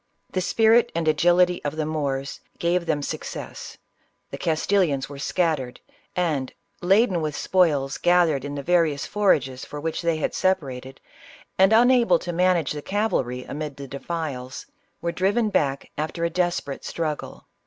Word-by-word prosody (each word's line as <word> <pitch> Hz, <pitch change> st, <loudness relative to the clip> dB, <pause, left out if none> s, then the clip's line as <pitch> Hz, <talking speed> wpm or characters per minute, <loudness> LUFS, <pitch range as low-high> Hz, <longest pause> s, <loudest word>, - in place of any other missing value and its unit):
The 185 Hz, -, -1 dB
spirit 225 Hz, +5 st, +4 dB
and 165 Hz, -1 st, -1 dB
agility 175 Hz, +3 st, +3 dB
of 145 Hz, +1 st, -3 dB
the 155 Hz, -1 st, -1 dB
Moors 140 Hz, -3 st, -3 dB, 0.2 s
gave 170 Hz, 0 st, 0 dB
them 150 Hz, -3 st, 0 dB
success; -, -, -6 dB, 0.5 s
the -, -, -5 dB
Castilians 160 Hz, -3 st, +1 dB
were 140 Hz, -1 st, -9 dB
scattered, 150 Hz, -6 st, -1 dB, 0.4 s
and 155 Hz, -7 st, -1 dB, 0.3 s
laden 190 Hz, 0 st, +3 dB
with 155 Hz, -2 st, -2 dB
spoils 145 Hz, -7 st, +1 dB
gathered 170 Hz, -6 st, +3 dB
in 145 Hz, 0 st, -5 dB
the 140 Hz, -, -5 dB
various 165 Hz, -4 st, +2 dB
forages 140 Hz, -11 st, +1 dB
for 150 Hz, -, -7 dB
which 160 Hz, +3 st, -3 dB
they 170 Hz, -2 st, +1 dB
had 155 Hz, -, -2 dB
separated, 135 Hz, -8 st, -1 dB, 0.6 s
and, 190 Hz, +2 st, +6 dB
unable 235 Hz, -5 st, +5 dB
to 175 Hz, +1 st, -5 dB
manage 180 Hz, -3 st, +2 dB
the 150 Hz, -, -4 dB
cavalry 145 Hz, -, -1 dB
amid 150 Hz, 0 st, -6 dB
the 140 Hz, -1 st, -7 dB
defiles, 140 Hz, -3 st, -5 dB, 0.4 s
were 170 Hz, -, 0 dB
driven 205 Hz, +5 st, +1 dB
back 140 Hz, -7 st, 0 dB
after 165 Hz, +2 st, -2 dB
a 170 Hz, -, -1 dB
desperate 175 Hz, -5 st, -1 dB
struggle. 155 Hz, -3 st, -4 dB
165 Hz, 150 wpm, -24 LUFS, 140-180 Hz, 0.6 s, and